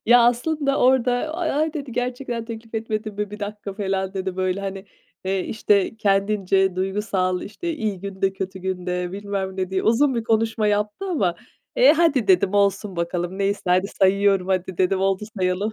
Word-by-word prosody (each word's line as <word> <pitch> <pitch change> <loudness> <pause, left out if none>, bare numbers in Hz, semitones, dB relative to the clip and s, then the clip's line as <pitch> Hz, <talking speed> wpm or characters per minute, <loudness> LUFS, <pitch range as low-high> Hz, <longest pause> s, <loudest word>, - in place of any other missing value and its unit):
Ya 240 +1 +7
aslında 275 +3 +1
orada 255 -1 +4 0.2
"A-ay" 315 -2 0
dedi. 275 -5 -5
"gerçekten 245 -1 -3
teklif 225 0 -9
etmedim 215 -1 -3
mi? 205 0 -3
1 210 - -8
dakika." 205 0 -5
falan 195 -1 -2
dedi. 190 -1 -3
Böyle 185 +1 0
hani, 195 0 -5 0.4
eee, 190 0 0
işte, 210 0 +1
kendince 195 -2 +1
duygusal, 190 -1 -1
işte, 335 - -5
iyi 215 - -3
günde 195 0 -1
kötü 190 0 -5
günde 180 -1 -3
bilmem 195 -1 -4
ne 185 0 -2
diye 190 - 0
uzun 260 +4 +3
bir 230 -1 -2
konuşma 225 -1 +1
yaptı 210 - 0
ama, 190 - +1 0.4
eee, - - +7
"Hadi" 295 -9 +2
dedim 190 +1 +4
"olsun 200 -1 +1
bakalım 175 +2 -2
neyse 200 +1 0
hadi 180 +2 +3
sayıyorum 195 -1 +2
hadi" 185 -1 -1
dedim 190 +1 +2
"oldu 195 +1 +1
sayalım." 185 +3 0
200 Hz, 170 wpm, -23 LUFS, 190-225 Hz, 0.4 s, Ya